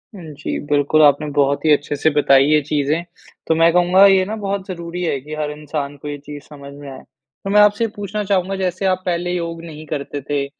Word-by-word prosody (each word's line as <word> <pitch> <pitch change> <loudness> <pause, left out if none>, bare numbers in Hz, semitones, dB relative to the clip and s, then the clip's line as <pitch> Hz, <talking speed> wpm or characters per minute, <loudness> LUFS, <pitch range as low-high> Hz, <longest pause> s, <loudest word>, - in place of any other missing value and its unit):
हुँ, 180 - -10
जी। 145 - -4
बिल्कुल 145 +1 +3
आपने 145 +1 +4
बहुत 140 0 +1
ही 155 - +4
अच्छे 145 0 -1
से 160 +3 +2
बताई 135 -2 +5
ये 150 +1 +4
चीज़ें 150 +3 -1 0.4
तो 160 - +2
मैं 165 +1 +4
कहूँगा 180 +2 +5
ये 190 -1 +5
ना 215 +3 -4
बहुत 195 -1 -3
ज़रूरी 170 -1 -6
है 140 -5 -1
कि 150 +3 -9
हर 150 -1 -3
इंसान 150 -1 -5
को 145 - -10
ये 145 0 -4
चीज़ 145 -1 -9
समझ 140 -1 -11
में 145 0 -10
आए। 130 - -10 0.4
तो 195 - -4
मैं 210 +1 +5
आपसे 210 +2 +3
पूछना 205 +1 -4
चाहूँगा 195 -1 0
जैसे 185 0 -2
आप 185 -1 +1
पहले 175 0 -1
योग 170 -1 -4
नहीं 155 -1 -10
करते 145 -1 -5
थे 145 -1 0
160 Hz, 225 wpm, -19 LUFS, 145-185 Hz, 0.4 s, बताई